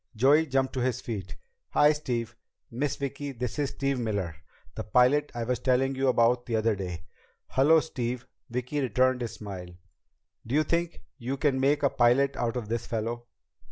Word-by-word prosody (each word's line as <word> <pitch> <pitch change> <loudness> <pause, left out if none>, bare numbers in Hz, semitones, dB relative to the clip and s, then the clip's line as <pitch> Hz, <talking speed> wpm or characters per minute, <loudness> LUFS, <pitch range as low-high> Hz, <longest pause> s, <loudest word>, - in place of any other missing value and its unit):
Joey 145 +8 +4
jumped 135 -1 0
to 130 - -2
his 125 -1 0
feet. 100 -6 -5 0.4
"Hi, 150 +1 +6
Steve! 120 -6 -3 0.4
Miss 135 +4 -1
Vicki, 140 0 -4
this 125 +3 -4
is 145 -2 +1
Steve 140 -2 -1
Miller, 100 -8 -2 0.4
the - - -5
pilot 130 +6 +3
I 120 - -2
was 125 +2 -1
telling 130 +1 +2
you 135 0 0
about 120 0 +3
the 115 - -1
other 110 0 +2
day." 90 -4 -5 0.5
"Hello, 150 +5 +5
Steve." 125 -5 -4 0.2
Vicki 125 +4 -2
returned 130 +1 +2
his 115 -2 -3
smile. 95 -5 -7 0.8
"Do 125 - -1
you 155 - +4
think 170 +1 -2 0.2
you 130 +3 -3
can 135 -2 +1
make 145 +2 +2
a 140 - +5
pilot 125 +3 +3
out 120 0 -1
of 115 -4 -4
this 115 +1 -3
fellow?" 115 +1 -3
125 Hz, 180 wpm, -28 LUFS, 115-140 Hz, 0.8 s, Hi